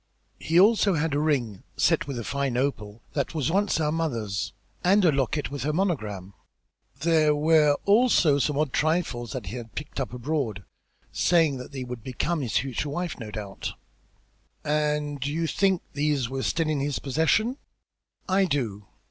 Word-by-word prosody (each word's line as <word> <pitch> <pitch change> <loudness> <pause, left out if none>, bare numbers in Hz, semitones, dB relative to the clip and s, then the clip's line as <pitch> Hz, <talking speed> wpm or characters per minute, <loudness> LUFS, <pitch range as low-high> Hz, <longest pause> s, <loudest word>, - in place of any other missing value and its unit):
"He 165 +2 +2
also 205 -1 +5
had 160 -1 0
a 145 - +1
ring 130 -10 0 0.2
set - - +2
with 140 -3 -4
a 120 - -3
fine 140 0 -1
opal, 115 -5 -2
that 140 +2 -2
was 155 0 0
once 200 -1 +1
our 150 -1 +1
mother's, 115 -12 -2 0.3
and 195 +2 +4
a 165 - +6
locket 140 +1 -1
with 145 - -4
her 150 - 0
monogram. 110 - -2 0.7
There 155 -2 +3
were 150 -1 +4
also 200 - +4
some 145 +1 0
odd 150 -3 0
trifles 155 -7 0
that 130 -6 -5
he 95 +8 -5
had 115 -2 -9
picked 150 -1 -6
up 135 - -2
abroad, 125 -5 -2 0.5
saying 165 -6 +3
that 125 - -9
they 135 -2 -5
would 125 -3 -7
become 150 +5 -2
his 120 -5 0
future 135 +2 -2
wife, 175 +2 -3
no 110 -3 -6
doubt." 105 -2 -6 0.9
"And 150 -2 0
you 155 +4 -1
think 190 +2 +1
these 145 -3 0
were 135 0 -3
still 165 +3 0
in 155 -2 0
his 140 0 -1
possession?" 160 - +1 0.7
"I 195 +1 +3
do. 115 - -2
145 Hz, 170 wpm, -26 LUFS, 125-160 Hz, 0.9 s, a